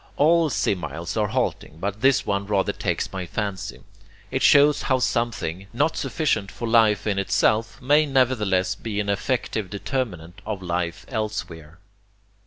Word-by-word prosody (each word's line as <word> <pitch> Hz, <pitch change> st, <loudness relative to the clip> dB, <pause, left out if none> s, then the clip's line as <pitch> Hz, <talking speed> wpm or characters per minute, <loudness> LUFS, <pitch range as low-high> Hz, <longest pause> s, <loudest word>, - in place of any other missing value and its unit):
All 165 Hz, +2 st, +4 dB
similes 85 Hz, -, -2 dB
are 105 Hz, -2 st, +1 dB
halting 80 Hz, -, -2 dB
but 100 Hz, +3 st, -3 dB
this 135 Hz, +1 st, +3 dB
one 100 Hz, 0 st, -1 dB
rather 100 Hz, -2 st, +1 dB
takes -, -, -2 dB
my 95 Hz, -2 st, -4 dB
fancy. 100 Hz, -1 st, -4 dB, 0.5 s
It -, -, -1 dB
shows 145 Hz, 0 st, +6 dB
how 130 Hz, -, +1 dB
something, 100 Hz, -7 st, -1 dB
not 150 Hz, +7 st, +1 dB
sufficient 145 Hz, -11 st, -1 dB
for 120 Hz, -, -5 dB
life 110 Hz, -3 st, +4 dB
in 100 Hz, -2 st, 0 dB
itself, 110 Hz, +3 st, +1 dB
may 145 Hz, +4 st, +3 dB
nevertheless 120 Hz, -9 st, +2 dB
be 105 Hz, -3 st, -5 dB
an 100 Hz, -1 st, -1 dB
effective 110 Hz, -1 st, -1 dB
determinant 100 Hz, -, -4 dB
of 100 Hz, -3 st, -5 dB
life 85 Hz, -1 st, -3 dB
elsewhere. 105 Hz, -, -5 dB
105 Hz, 145 wpm, -24 LUFS, 95-125 Hz, 0.5 s, shows